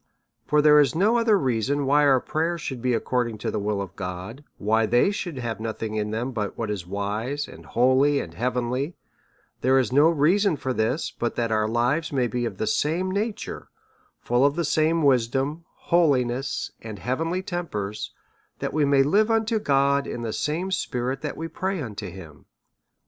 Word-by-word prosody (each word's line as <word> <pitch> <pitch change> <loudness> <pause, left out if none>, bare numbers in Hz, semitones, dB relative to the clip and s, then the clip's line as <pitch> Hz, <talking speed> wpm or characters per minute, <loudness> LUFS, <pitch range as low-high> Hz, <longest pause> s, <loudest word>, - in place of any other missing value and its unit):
For 150 0 +3
there 150 0 +7
is 145 +1 +3
no 215 +7 +3
other 225 -3 +4
reason 135 - 0
why 145 +2 +4
our 135 -2 +5
pray 155 +5 -1
ers 170 -1 -3
should 130 -5 -5
be 125 -1 +1
according 120 -1 -1
to 105 - -3
the - - -2
will 105 0 -1
of 95 -1 -6
God, 95 +8 -6
why 110 +2 +2
they 120 - +3
should 175 -7 -4
have 115 -3 -4
nothing 110 -1 -4
in 105 -1 -1
them 115 +4 -2
but 105 -4 -4
what 110 -2 -2
is 95 -4 -5
wise, 105 +9 -3
and - - -13
holy, 130 +4 +3
and 85 - -6
heavenly, 125 - -2 0.7
there 130 +1 +4
is 125 -3 +1
no 145 +4 +6
other 165 - +2
reason 185 +3 +3
for 130 -1 -2
this, 125 +7 -1
but 120 - -3
that 115 -1 -1
our 110 -1 +2
lives 120 +8 0
may 130 -3 +1
be 120 0 -2
of 100 -5 -5
the 110 - -1
same 170 +10 0
nature, 210 +3 -4 0.5
full 120 +2 +1
of 140 +1 +3
the 170 -1 0
same 160 +2 +2
wisdom, 135 +4 +1 0.2
holiness, 135 -6 +1
and 110 -2 -7
heavenly 165 - -2
tempers, 110 - -4 0.5
that - - -4
we 155 0 +2
may 140 -1 +4
live 205 +10 +3
unto 225 0 +1
God 140 -3 +2
in 120 - -5
the 110 -2 -3
same 170 +6 -2
spirit 130 -7 -2
that 150 - -4
we 165 - -4
pray 190 +2 -3
unto 105 -7 -5
him. 80 -6 -12
130 Hz, 190 wpm, -25 LUFS, 115-155 Hz, 0.7 s, there